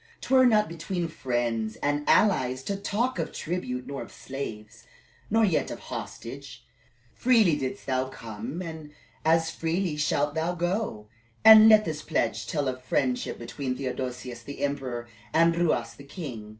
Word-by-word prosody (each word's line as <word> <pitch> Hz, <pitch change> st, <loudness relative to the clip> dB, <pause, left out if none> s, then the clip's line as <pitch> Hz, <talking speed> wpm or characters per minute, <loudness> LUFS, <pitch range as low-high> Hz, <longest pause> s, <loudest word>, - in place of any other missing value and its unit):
"'T -, -, -4 dB
were 260 Hz, -1 st, +7 dB
not 215 Hz, -3 st, +4 dB
between 170 Hz, +1 st, -3 dB
friends 120 Hz, -7 st, -2 dB
and 145 Hz, 0 st, -1 dB
allies 130 Hz, -11 st, +3 dB
to 200 Hz, -, -2 dB
talk 225 Hz, +6 st, -1 dB
of -, -, -2 dB
tribute, 140 Hz, -8 st, -4 dB
nor 140 Hz, -1 st, -5 dB
of -, -, -9 dB
slaves, 110 Hz, -6 st, -8 dB, 0.4 s
nor 225 Hz, +1 st, +4 dB
yet 175 Hz, -6 st, +1 dB
of -, -, -5 dB
hostage. -, -, -8 dB, 0.5 s
Freely 225 Hz, -10 st, +4 dB
did'st 135 Hz, -3 st, -4 dB
thou 130 Hz, 0 st, 0 dB
come 115 Hz, -, -6 dB
and 160 Hz, -3 st, -7 dB, 0.3 s
as 160 Hz, 0 st, +3 dB
freely 165 Hz, +1 st, -1 dB
shalt 150 Hz, -1 st, 0 dB
thou 165 Hz, +3 st, -1 dB
go; 175 Hz, -, -2 dB, 0.4 s
and 220 Hz, 0 st, +11 dB
let 215 Hz, -1 st, +7 dB
this 155 Hz, -2 st, -3 dB
pledge 155 Hz, -, -1 dB
tell 145 Hz, -5 st, -1 dB
of 130 Hz, 0 st, -3 dB
friendship 125 Hz, -1 st, -1 dB
between 125 Hz, +2 st, -4 dB
Theodosius 125 Hz, -2 st, -4 dB
the 140 Hz, +3 st, -9 dB
emperor 130 Hz, -4 st, -3 dB, 0.3 s
and 165 Hz, +1 st, +5 dB
Ruas 155 Hz, -9 st, 0 dB
the 140 Hz, -, -13 dB
king." 135 Hz, -, -7 dB
145 Hz, 155 wpm, -27 LUFS, 125-175 Hz, 0.5 s, and